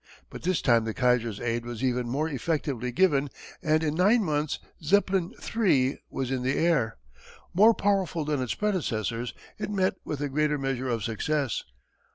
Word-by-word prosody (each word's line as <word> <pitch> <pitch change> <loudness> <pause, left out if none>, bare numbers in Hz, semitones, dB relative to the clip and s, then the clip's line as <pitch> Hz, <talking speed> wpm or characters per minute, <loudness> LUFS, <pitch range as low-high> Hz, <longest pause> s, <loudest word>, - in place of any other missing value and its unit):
But - - -8
this 180 -1 0
time 115 -3 +4
the 110 - -3
Kaiser's 125 -4 +1
aid 115 0 -1
was 120 0 -6
even 125 -2 0
more 145 +6 0
effectively 140 -4 -2
given 145 -1 +3 0.3
and 155 -1 +2
in 150 -2 0
nine 205 +7 +4
months 150 -3 -1 0.2
Zeppelin 190 +1 +2 0.2
III. 140 - +3
was 130 -1 -3
in 130 -1 -1
the 130 +2 0
air. 150 - +2 0.6
More 215 +5 +6
powerful 190 -6 0
than 145 -3 0
its 125 - -2
predecessors 120 - -1 0.2
it 210 - -3
met 190 -2 +1
with 150 - -4
a 145 - 0
greater 150 +1 +1
measure 135 -2 -2
of 115 -3 -1
success. 135 +5 -1
145 Hz, 170 wpm, -27 LUFS, 125-170 Hz, 0.6 s, More